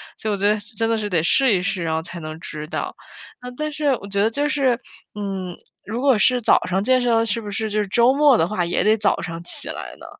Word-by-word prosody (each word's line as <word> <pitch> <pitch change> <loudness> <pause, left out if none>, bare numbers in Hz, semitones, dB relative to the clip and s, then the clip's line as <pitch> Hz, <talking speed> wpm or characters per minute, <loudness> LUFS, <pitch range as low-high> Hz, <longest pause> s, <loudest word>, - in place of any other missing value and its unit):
所 220 - -4
以 - - +1
我 - - -6
觉 200 +1 +2
得 210 0 +2 0.2
真 225 +1 +1
的 230 - +1
是 210 - -3
得 165 -4 +1
试 265 +7 +4
一 195 - +3
试， 190 -2 -2
然 160 -1 -1
后 160 - -2
才 175 0 -8
能 155 0 -7
知 155 -2 -7
道。 - - -4 0.6
但 305 0 -2
是 300 0 -4 0.2
我 200 - -8
觉 200 0 0
得 220 - +3
就 290 +5 0
是， 270 -5 +1 0.4
嗯， 195 -3 -4 0.3
如 225 +4 -4
果 270 -1 +4
是 250 +4 +3
早 - - +4
上 190 +2 0
健 255 +3 +3
身 230 -2 +2
是 230 +1 -1
不 210 - -7
是 215 +2 -3
就 210 0 +1
是 205 - -3
周 240 +5 +4
末 285 -3 +5
的 165 - +2
话 185 -3 -1
也 170 - 0
得 215 +1 +4
早 205 -1 +1
上 165 0 -6
起 - - -2
来 - - -6
呢？ - - -12
210 Hz, 290 characters per minute, -21 LUFS, 185-240 Hz, 0.6 s, 末